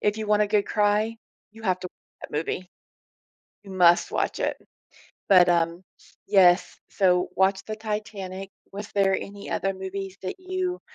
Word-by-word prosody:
if 210 Hz, +1 st, +1 dB
you 220 Hz, -, -4 dB
want 210 Hz, 0 st, +3 dB
a -, -, +2 dB
good 205 Hz, -1 st, +1 dB
cry, 210 Hz, +2 st, +1 dB, 0.4 s
you 225 Hz, 0 st, -14 dB
have 185 Hz, -3 st, +1 dB
to 180 Hz, -, -5 dB, 0.3 s
that -, -, -8 dB
movie. 180 Hz, +4 st, -3 dB, 0.9 s
You 195 Hz, -, -12 dB
must 175 Hz, -2 st, +4 dB
watch -, -, -1 dB
it -, -, 0 dB, 0.7 s
but, 185 Hz, -3 st, +7 dB
um 170 Hz, +1 st, +1 dB, 0.4 s
yes, 180 Hz, -2 st, +4 dB
so 180 Hz, -2 st, +2 dB
watch 190 Hz, +1 st, +2 dB
the 215 Hz, -, -4 dB
Titanic. 210 Hz, -3 st, -5 dB, 0.2 s
Was 205 Hz, +1 st, -7 dB
there 195 Hz, -1 st, +3 dB
any 200 Hz, +1 st, -7 dB
other 195 Hz, 0 st, 0 dB
movies 190 Hz, 0 st, -6 dB
that 185 Hz, -, -3 dB
you, 370 Hz, -1 st, -3 dB
195 Hz, 160 wpm, -25 LUFS, 185-210 Hz, 0.9 s, but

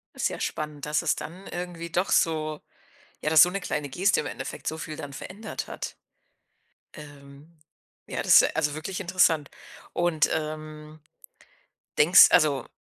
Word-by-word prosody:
Ist -, -, 0 dB
ja -, -, -7 dB
spannend, 150 Hz, -2 st, -4 dB
dass 150 Hz, 0 st, 0 dB
es 170 Hz, -, +1 dB
dann 185 Hz, +5 st, -9 dB
irgendwie 175 Hz, -1 st, -6 dB
doch 180 Hz, +4 st, 0 dB
so 155 Hz, -2 st, +1 dB, 0.6 s
ja, 155 Hz, -, 0 dB
dass 155 Hz, -, +8 dB
so 180 Hz, -, +7 dB
'ne 195 Hz, -, -3 dB
kleine 145 Hz, -4 st, -3 dB
Geste 190 Hz, +8 st, +1 dB
im 150 Hz, -, -6 dB
Endeffekt -, -, -7 dB
so 160 Hz, -, -2 dB
viel 155 Hz, 0 st, -7 dB
dann 145 Hz, -2 st, -8 dB
verändert 205 Hz, +10 st, -7 dB
hat. -, -, -6 dB, 1.0 s
Ähm, 145 Hz, +1 st, -14 dB, 0.5 s
ja, -, -, -3 dB
das -, -, +7 dB
ist -, -, -1 dB
also 150 Hz, -2 st, 0 dB
wirklich 180 Hz, +5 st, -5 dB
interessant. 170 Hz, -6 st, +2 dB, 0.4 s
Und, 175 Hz, -3 st, +1 dB
ähm, 155 Hz, 0 st, -6 dB, 1.0 s
denkst 170 Hz, +5 st, +8 dB
also, 150 Hz, -7 st, +3 dB
155 Hz, 155 wpm, -26 LUFS, 150-175 Hz, 1.0 s, dass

